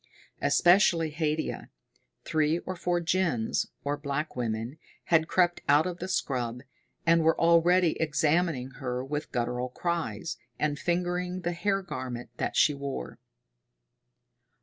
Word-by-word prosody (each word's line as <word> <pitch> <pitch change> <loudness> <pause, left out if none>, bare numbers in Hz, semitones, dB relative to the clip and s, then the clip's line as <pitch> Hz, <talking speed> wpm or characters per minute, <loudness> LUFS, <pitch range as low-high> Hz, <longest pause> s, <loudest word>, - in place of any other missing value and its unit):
Especially 175 -3 +4
Haidia. 155 0 -2 0.6
Three 155 +1 +2
or 185 +2 -5
four 175 0 0
gins, 170 -9 0 0.2
or 145 +1 -1
black 145 +1 -3
women, 120 +3 -3 0.2
had 160 -2 +3
crept 175 -1 +2
out 145 +2 +5
of 180 -1 -4
the 185 - -4
scrub, 125 -9 -2 0.4
and 165 0 +5
were 160 0 +3
already 170 +1 +5
examining 155 -3 +1
her 125 0 -2
with 150 +2 -4
guttural 125 +1 -1
cries, 165 -3 -3 0.2
and 150 -1 -1
fingering 180 +1 -1
the 175 0 -2
hair 195 +3 0
garment 120 -9 -6
that - - -2
she 150 - +5
wore. 140 - -6
160 Hz, 125 wpm, -28 LUFS, 135-175 Hz, 0.6 s, out